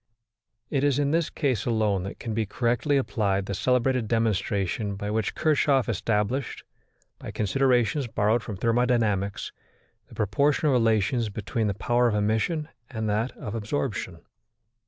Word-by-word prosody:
It 140 -2 +1
is 145 -2 +3
in 145 -1 +1
this 165 0 +1
case 130 -9 -1
alone 110 -5 +1
that 100 - -6
can 115 - -5
be 110 -1 -1
correctly 125 +6 +1
applied 100 -7 0
the 100 - -4
celebrated 125 +2 +1
demonstration 105 -2 0
by 105 +1 -4
which 110 -1 -1
Kirchhoff 145 -4 +2
established, 115 +5 -1 0.6
by - - -8
considerations 125 - +1
borrowed 110 +1 +1
from 105 -3 -6
thermodynamics, 115 -3 +1 0.6
the - - -15
proportional 140 +8 +2
relations 115 -1 +2
between 110 +2 -2
the 100 - -1
power 120 +5 +2
of 110 - +1
emission 110 +10 0 0.2
and 110 -4 -3
that 110 +5 0
of 105 - -6
absorption. 110 -6 -3
115 Hz, 140 wpm, -26 LUFS, 105-130 Hz, 0.6 s, is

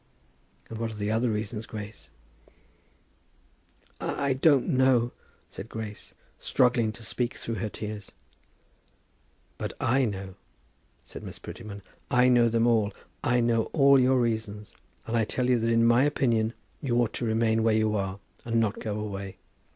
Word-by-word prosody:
"And 115 - -7
what 115 0 -1
are 110 - -8
the 105 0 -2
other 115 +2 +1
reasons, 105 +1 -3
Grace?" 105 -1 -8 1.9
"I 140 -1 -1
don't 135 0 +3
know," 130 -2 +3 0.4
said 110 - -9
Grace, 110 -2 -7 0.2
struggling 125 -4 +2
to 115 0 -10
speak 120 +2 -1
through 115 -3 -4
her 110 - -2
tears. 105 -1 -7 1.5
"But - - -3
I 130 +2 +2
know," 95 -3 -5 0.7
said - - -10
Miss - - -8
Prettyman. 100 -3 -9 0.3
"I 125 +1 +4
know 120 -2 +5
them 115 0 +2
all. 110 -4 +3 0.3
I 120 0 +2
know 115 -1 +2
all 140 -2 +6
your 130 0 +4
reasons, 110 -3 -2 0.3
and 115 - -2
I 115 - +3
tell 125 +3 -1
you 125 -2 +3
that 115 +1 0
in 115 0 +4
my 120 +2 +5
opinion 120 -6 +1 0.3
you 120 -4 0
ought 120 -2 +1
to 120 - -3
remain 110 0 +2
where 110 -1 +3
you 110 -1 +2
are, 95 -1 -2 0.3
and 115 0 0
not 110 -1 0
go 105 -1 -3
away. 100 -2 -5
115 Hz, 160 wpm, -27 LUFS, 110-120 Hz, 1.9 s, all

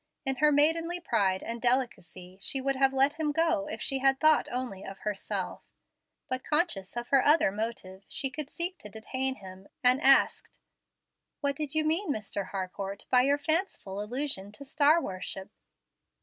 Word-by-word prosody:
In 270 -1 0
her 300 +2 +4
maidenly 330 +4 +3
pride 200 - 0
and 230 0 -5
delicacy, 190 -8 -1
she 270 - -1
would 275 +1 0
have 270 0 +3
let 270 +3 +2
him 305 -2 0
go 325 -1 +1
if 305 - -6
she 270 -1 0
had 270 0 +3
thought 310 -1 +4
only 245 -6 -4
of 195 - -8
herself; 210 -2 -4 0.7
but, 255 0 -3
conscious 295 - -1
of 240 0 -4
her 275 -2 +4
other 300 -9 +4
motive, 205 -3 -5
she 270 -3 -3
could 290 +1 -5
seek 350 +3 -2
to 210 - -10
detain 260 +5 -2
him, 190 -2 -12 0.2
and 250 +3 +4
asked, 275 -1 +4 0.9
"What 280 -1 0
did 300 0 -4
you 310 0 +1
mean, 325 +4 0
Mr. 205 -5 -3
Harcourt, 195 +1 -5
by 250 - +6
your 280 +3 +2
fanciful 300 - -2
allusion 220 -3 -3
to 280 - -10
star 300 +3 +4
worship?" 190 - -6
265 Hz, 170 wpm, -29 LUFS, 205-300 Hz, 0.9 s, by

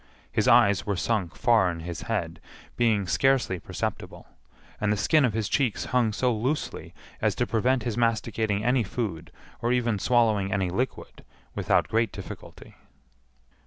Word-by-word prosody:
His - - 0
eyes 100 -3 +5
were 100 - -1
sunk 95 -1 -1
far 115 -6 +3
in 85 -1 -5
his 85 -1 -6
head, - - -3 0.4
being 110 -4 +2
scarcely 130 -3 +1
perceptible, - - -5 0.5
and 105 0 +1
the 105 - +1
skin 155 +9 +3
of 120 - 0
his 110 -2 -1
cheeks 130 -8 0
hung 120 -3 +3
so 125 +4 +1
loosely 130 +8 -3 0.3
as - - +1
to - - 0
prevent 125 +3 +1
his 120 -2 -3
masticating 110 -2 0
any 125 +1 +3
food, 90 -7 -4 0.3
or 120 - 0
even 120 -4 +1
swallowing 110 -4 +2
any 95 -3 0
liquid, 125 +8 -4 0.3
without - - +1
great 115 -1 +1
difficulty. - - -10
110 Hz, 155 wpm, -26 LUFS, 100-120 Hz, 0.5 s, eyes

